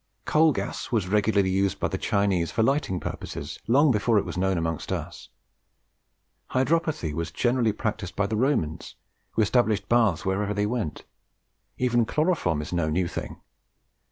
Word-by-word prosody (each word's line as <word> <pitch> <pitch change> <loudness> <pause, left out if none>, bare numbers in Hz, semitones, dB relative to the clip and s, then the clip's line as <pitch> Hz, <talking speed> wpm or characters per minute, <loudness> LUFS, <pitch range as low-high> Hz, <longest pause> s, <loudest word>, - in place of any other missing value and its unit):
Coal 155 +1 +4
gas 100 0 -4
was 110 -6 +1
regularly 100 -1 +2
used 95 0 0
by - - +1
the - - -3
Chinese 95 -4 +1
for 110 - 0
lighting 135 -8 +1
purposes - - -6
long 140 +5 +5
before 110 0 +2
it 100 - +1
was - - -5
known 95 0 +1
amongst 80 -2 -3
us. - - -5 1.2
Hydropathy 140 - +1
was 85 +1 -3
generally 120 +5 +1
practised 105 -3 -4
by 105 - +1
the 110 - -2
Romans, 110 - -1 0.4
who 110 - +3
established 110 -1 +1
baths 110 -8 +2
wherever 100 +2 0
they 105 0 +1
went. 105 -9 -3 0.7
Even 120 -2 +2
chloroform 150 - 0
is 85 - -7
no 85 -3 0
new 85 +3 0
thing. - - -6
105 Hz, 155 wpm, -26 LUFS, 90-120 Hz, 1.2 s, long